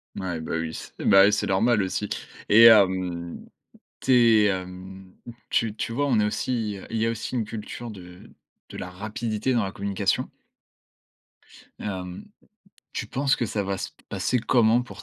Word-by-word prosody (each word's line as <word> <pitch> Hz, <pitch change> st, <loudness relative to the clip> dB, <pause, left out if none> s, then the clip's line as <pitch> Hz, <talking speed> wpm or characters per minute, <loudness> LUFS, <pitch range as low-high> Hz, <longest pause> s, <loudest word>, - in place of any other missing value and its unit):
Ouais, 90 Hz, -4 st, -4 dB
bah, 80 Hz, -, -5 dB
oui 80 Hz, 0 st, -4 dB
c'est -, -, -8 dB
ben 95 Hz, -1 st, +7 dB
oui 105 Hz, -, +4 dB
c'est 105 Hz, -, 0 dB
normal 105 Hz, +2 st, +2 dB
aussi 95 Hz, +2 st, -3 dB, 0.4 s
et 110 Hz, +3 st, +7 dB
hem, 95 Hz, -6 st, +4 dB, 0.5 s
tu 135 Hz, -, +1 dB, 0.3 s
es -, -, +4 dB
hem, 95 Hz, 0 st, -5 dB, 0.4 s
tu 110 Hz, -2 st, +1 dB
tu 115 Hz, -, -3 dB
vois, 145 Hz, +5 st, 0 dB
on 120 Hz, -5 st, +3 dB
est 105 Hz, -, +3 dB
aussi, 110 Hz, -1 st, -2 dB
heu -, -, -11 dB
il 115 Hz, -, -3 dB
y 110 Hz, -, +1 dB
a 115 Hz, -, +1 dB
aussi 115 Hz, +3 st, -4 dB
une 115 Hz, -, 0 dB
culture 110 Hz, +2 st, -7 dB
de 90 Hz, -2 st, -13 dB, 0.4 s
de -, -, -9 dB
la 90 Hz, -, -6 dB
rapidité 110 Hz, +5 st, -3 dB
dans 115 Hz, -, +2 dB
la 95 Hz, -, -2 dB
communication. 100 Hz, 0 st, -1 dB, 1.5 s
Hem, 90 Hz, -3 st, -6 dB, 0.7 s
tu 120 Hz, -, -4 dB
penses 135 Hz, +5 st, +1 dB
que 120 Hz, -, -1 dB
ça 105 Hz, -1 st, -2 dB
va 100 Hz, -1 st, -3 dB
se -, -, -5 dB, 0.2 s
passer 125 Hz, -, 0 dB
comment 115 Hz, 0 st, +3 dB
pour 100 Hz, -2 st, -11 dB
105 Hz, 175 wpm, -25 LUFS, 95-115 Hz, 1.5 s, ben